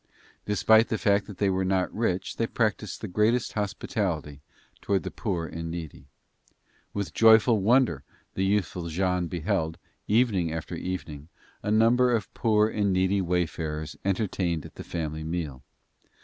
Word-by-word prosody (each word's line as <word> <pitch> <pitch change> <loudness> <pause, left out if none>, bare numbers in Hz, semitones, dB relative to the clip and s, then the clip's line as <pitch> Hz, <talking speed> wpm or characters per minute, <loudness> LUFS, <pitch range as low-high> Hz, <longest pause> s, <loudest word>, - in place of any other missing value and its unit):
Despite 110 +2 +4
the 110 - -1
fact 100 -1 +2
that 100 -3 -9
they 100 -2 +2
were 95 0 0
not 95 -1 0
rich 95 -5 -1
they 115 - 0
practiced 105 -4 -1
the 110 - -4
greatest 110 +5 +1
hospitality 95 -8 -3 0.4
toward 95 -1 0
the - - -5
poor 90 -6 -2
and 85 0 -6
needy. 80 -4 -7 0.8
With 100 -6 -4
joyful 110 -1 +6
wonder 110 - +3 0.3
the 95 - -1
youthful 95 -3 0
Jean 90 +1 0
beheld, 85 -1 -1 0.3
evening 105 -7 +2
after 80 -1 -5
evening, 80 -5 -5 0.3
a - - -3
number 120 +3 +4
of 105 -3 -4
poor 105 -2 +3
and 105 -2 0
needy 95 +1 +2
wayfarers 80 -3 -2
entertained 90 -4 -1
at - - -11
the - - -9
family 80 -2 -4
meal. 80 -5 -4
95 Hz, 150 wpm, -27 LUFS, 85-105 Hz, 0.8 s, joyful